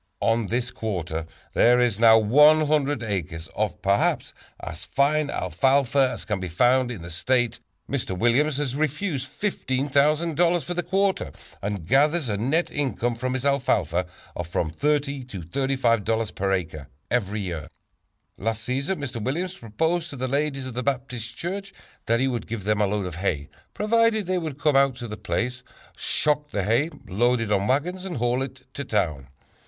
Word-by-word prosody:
On 115 Hz, -1 st, +2 dB
this 120 Hz, +2 st, -1 dB
quarter 85 Hz, -7 st, -3 dB, 0.3 s
there 120 Hz, +1 st, +5 dB
is 120 Hz, -4 st, +2 dB
now 115 Hz, -1 st, +8 dB
100 145 Hz, +3 st, +4 dB
acres 85 Hz, -6 st, -3 dB
of, -, -, -1 dB
perhaps, -, -, +1 dB, 0.3 s
as 80 Hz, +3 st, -7 dB
fine 145 Hz, +4 st, +1 dB
alfalfa 130 Hz, -, +2 dB
as -, -, -7 dB
can 105 Hz, -3 st, -1 dB
be 90 Hz, -, -4 dB
found 125 Hz, +9 st, +3 dB
in 105 Hz, -9 st, -6 dB
the 85 Hz, -, -7 dB
state. 120 Hz, +7 st, +1 dB, 0.3 s
Mr. 120 Hz, -9 st, -2 dB
Williams 130 Hz, +7 st, +2 dB
has 140 Hz, -3 st, -1 dB
refused 150 Hz, -1 st, -1 dB
$15,000 155 Hz, +1 st, +1 dB
for 175 Hz, -, -3 dB
the 175 Hz, -, -1 dB
quarter 195 Hz, -, 0 dB, 0.3 s
and 100 Hz, -4 st, -3 dB
gathers 145 Hz, -, +3 dB
a 100 Hz, -, 0 dB
net 140 Hz, +11 st, +1 dB
income 125 Hz, -4 st, -1 dB
from 130 Hz, +2 st, -2 dB
his 130 Hz, +1 st, -3 dB
alfalfa 95 Hz, -, +1 dB, 0.3 s
of 90 Hz, -, -4 dB
from 85 Hz, -2 st, -1 dB
$30 140 Hz, -, -1 dB
to 95 Hz, -6 st, -6 dB
$35 115 Hz, -, 0 dB
per 95 Hz, 0 st, -1 dB
acre 80 Hz, -6 st, -2 dB, 0.2 s
every 105 Hz, -3 st, 0 dB
year. 85 Hz, -6 st, -4 dB, 0.7 s
"Last 115 Hz, +2 st, -2 dB
season 140 Hz, +10 st, -1 dB
Mr. 120 Hz, -5 st, -4 dB
Williams 175 Hz, +9 st, -2 dB
proposed 160 Hz, -, -1 dB
to 145 Hz, -, -7 dB
the 130 Hz, 0 st, -2 dB
ladies 140 Hz, 0 st, -1 dB
of 130 Hz, -, -6 dB
the 125 Hz, -, -2 dB
Baptist 125 Hz, -3 st, -3 dB
church 195 Hz, +3 st, -4 dB, 0.3 s
that 115 Hz, +1 st, +3 dB
he 135 Hz, -, +2 dB
would 120 Hz, -3 st, -3 dB
give 110 Hz, -3 st, -4 dB
them 105 Hz, +1 st, +1 dB
a 105 Hz, -, +3 dB
load 100 Hz, 0 st, -1 dB
of 90 Hz, -2 st, -6 dB
hay, 80 Hz, -6 st, -1 dB, 0.3 s
provided 220 Hz, 0 st, +2 dB
they 185 Hz, 0 st, 0 dB
would 155 Hz, -5 st, -5 dB
come 150 Hz, -2 st, +2 dB
out 135 Hz, -1 st, +4 dB
to 120 Hz, -1 st, -6 dB
the 105 Hz, -, -5 dB
place, 120 Hz, +7 st, -2 dB, 0.3 s
shock 150 Hz, 0 st, 0 dB
the 100 Hz, -8 st, -1 dB
hay, 115 Hz, -, +2 dB, 0.2 s
load 120 Hz, +6 st, +2 dB
it 115 Hz, -2 st, -2 dB
on 100 Hz, 0 st, +2 dB
wagons 175 Hz, +8 st, 0 dB
and 185 Hz, -4 st, -4 dB
haul 120 Hz, +2 st, +1 dB
it 130 Hz, -1 st, -6 dB
to 140 Hz, -, -4 dB
town. 80 Hz, -, -1 dB
125 Hz, 175 wpm, -25 LUFS, 105-145 Hz, 0.7 s, now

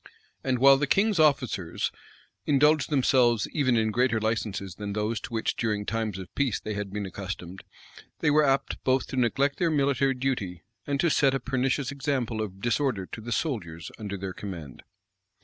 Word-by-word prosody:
And 130 Hz, -1 st, +1 dB
while 135 Hz, +2 st, +7 dB
the 145 Hz, +1 st, 0 dB
king's 200 Hz, +3 st, +2 dB
officers 130 Hz, -, +1 dB, 0.6 s
indulged 150 Hz, 0 st, +4 dB
themselves 125 Hz, -6 st, +3 dB
even 130 Hz, -5 st, +2 dB
in 110 Hz, -1 st, +2 dB
greater 120 Hz, 0 st, +2 dB
licenses 105 Hz, -4 st, -2 dB
than 100 Hz, +2 st, -5 dB
those 105 Hz, +1 st, -1 dB
to -, -, -8 dB
which 115 Hz, -1 st, -1 dB
during 105 Hz, -3 st, -1 dB
times 110 Hz, -3 st, -2 dB
of 95 Hz, -1 st, -9 dB
peace 135 Hz, -6 st, 0 dB
they 110 Hz, -, -5 dB
had 100 Hz, -1 st, -4 dB
been 105 Hz, 0 st, -3 dB
accustomed, 95 Hz, -1 st, -7 dB, 0.5 s
they 150 Hz, -, +2 dB
were 155 Hz, +1 st, +5 dB
apt 135 Hz, -1 st, 0 dB
both 130 Hz, 0 st, +2 dB
to -, -, -5 dB
neglect 135 Hz, +3 st, +1 dB
their 175 Hz, -2 st, +2 dB
military 140 Hz, -3 st, +2 dB
duty, 120 Hz, -10 st, -2 dB, 0.2 s
and 140 Hz, -1 st, -1 dB
to 170 Hz, -, +3 dB
set 135 Hz, -2 st, +3 dB
a -, -, 0 dB
pernicious 130 Hz, +2 st, -1 dB
example 130 Hz, -5 st, -2 dB
of 95 Hz, -2 st, -6 dB
disorder 120 Hz, -4 st, 0 dB
to 115 Hz, -, -6 dB
the 120 Hz, +2 st, -7 dB
soldiers 90 Hz, -, -3 dB
under 100 Hz, -2 st, -4 dB
their 95 Hz, -1 st, -5 dB
command. 85 Hz, -10 st, -8 dB
120 Hz, 180 wpm, -27 LUFS, 105-135 Hz, 0.6 s, while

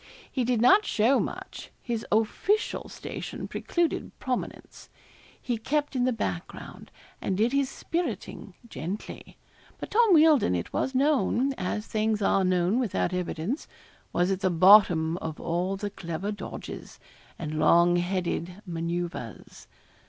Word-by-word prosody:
He 255 Hz, -, 0 dB
did 240 Hz, -1 st, +1 dB
not 390 Hz, -, +6 dB
show 235 Hz, -, +2 dB
much; -, -, -6 dB
his 235 Hz, -3 st, -4 dB
official 225 Hz, -, 0 dB
station -, -, -6 dB
precluded 345 Hz, -1 st, -2 dB
prominence. 255 Hz, -1 st, -5 dB, 0.5 s
He 240 Hz, -3 st, -3 dB
kept 290 Hz, +4 st, -1 dB
in 250 Hz, -1 st, +2 dB
the 255 Hz, -, +2 dB
background, 95 Hz, -, -5 dB, 0.3 s
and 190 Hz, -, -1 dB
did 230 Hz, +5 st, +2 dB
his 275 Hz, -1 st, +1 dB
spiriting 240 Hz, -, -4 dB
gently. 195 Hz, -1 st, -7 dB, 0.4 s
But -, -, -8 dB
Tom 440 Hz, -4 st, +5 dB
Wealdon, 305 Hz, -, +5 dB
it 85 Hz, -, -4 dB
was 265 Hz, -, -1 dB
known 275 Hz, -1 st, +2 dB
as 210 Hz, -1 st, -3 dB
things 215 Hz, -1 st, 0 dB
are 195 Hz, -1 st, +2 dB
known 185 Hz, +4 st, +2 dB
without 210 Hz, -6 st, -1 dB
evidence 180 Hz, -, -3 dB, 0.4 s
was 175 Hz, +2 st, +1 dB
at 190 Hz, -, -1 dB
the 190 Hz, -1 st, +1 dB
bottom 175 Hz, -2 st, +6 dB
of 160 Hz, -3 st, -6 dB
all 175 Hz, +3 st, -1 dB
the 205 Hz, +1 st, -4 dB
clever 175 Hz, +2 st, -4 dB
dodges, 205 Hz, -, -8 dB, 0.4 s
and 155 Hz, -1 st, -4 dB
long 170 Hz, +3 st, +5 dB
headed 175 Hz, 0 st, -2 dB
manoeuvres. 170 Hz, -, -5 dB
205 Hz, 135 wpm, -27 LUFS, 175-255 Hz, 0.5 s, not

